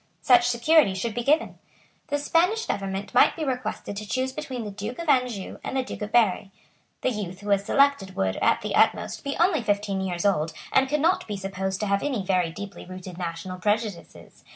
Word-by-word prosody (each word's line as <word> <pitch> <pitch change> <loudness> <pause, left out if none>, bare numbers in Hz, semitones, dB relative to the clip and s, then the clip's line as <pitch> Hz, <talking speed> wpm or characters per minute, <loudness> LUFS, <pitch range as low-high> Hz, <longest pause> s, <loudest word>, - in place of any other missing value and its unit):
Such 245 -1 +5
security 245 -2 +4
should 215 +4 -2
be 240 - -2
given. 300 +6 +1 0.5
The 290 - 0
Spanish 360 +9 +1
government 195 0 -3
might - - +5
be 320 - -4
requested 250 -6 -3
to 215 0 -6
choose 260 +6 -1
between 265 -5 -5
the 210 - -6
Duke 210 +5 -6
of 335 - -6
Anjou 250 -8 0
and - - -3
the 260 - +1
Duke - - -8
of 210 +1 -4
Berry. 210 -5 +3 0.5
The 255 - +1
youth 195 -5 -5
who 205 - -6
was 200 -1 +3
selected 280 -6 +2
would, 95 0 0
at - - +2
the - - -3
utmost, - - +2
be 280 0 -3
only 345 -4 +3
fifteen 205 -2 -1
years 180 -1 -2
old, 160 -5 +1 0.2
and 265 0 +4
could 300 0 0
not 340 +4 +2
be 205 -2 -4
supposed 190 0 -3
to - - 0
have 200 -1 +1
any 255 -9 -2
very 180 -3 +1
deeply 200 +4 -8
rooted 185 -1 -9
national 175 +1 -5
prejudices. 210 -2 -3
210 Hz, 205 wpm, -25 LUFS, 190-260 Hz, 0.5 s, Such